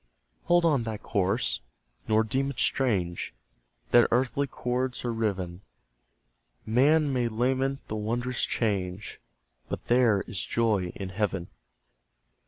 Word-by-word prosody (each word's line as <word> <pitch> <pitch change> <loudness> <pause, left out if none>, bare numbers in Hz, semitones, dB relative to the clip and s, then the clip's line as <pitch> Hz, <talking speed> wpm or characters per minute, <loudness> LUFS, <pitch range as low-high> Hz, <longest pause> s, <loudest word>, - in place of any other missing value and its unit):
Hold 175 0 +4
on 150 -6 +3
thy 110 -2 -4
course, 100 +2 0 0.5
nor 110 0 +4
deem 135 +5 0
it 140 - -7
strange 95 -10 0 0.6
That 120 - +7
earthly 130 +3 +1
cords 125 0 -2
are 120 - 0
riven: 95 -5 -2 1.0
Man 140 +5 +3
may 120 -2 +1
lament 130 +4 0
the 110 - -4
wondrous 120 +3 -1
change, 100 -3 -2 0.5
But - - -5
"there 120 -5 +4
is 95 -6 -4
joy 105 -6 +1
in 95 -1 -5
heaven!" 95 -2 -2
115 Hz, 120 wpm, -28 LUFS, 100-130 Hz, 1.0 s, That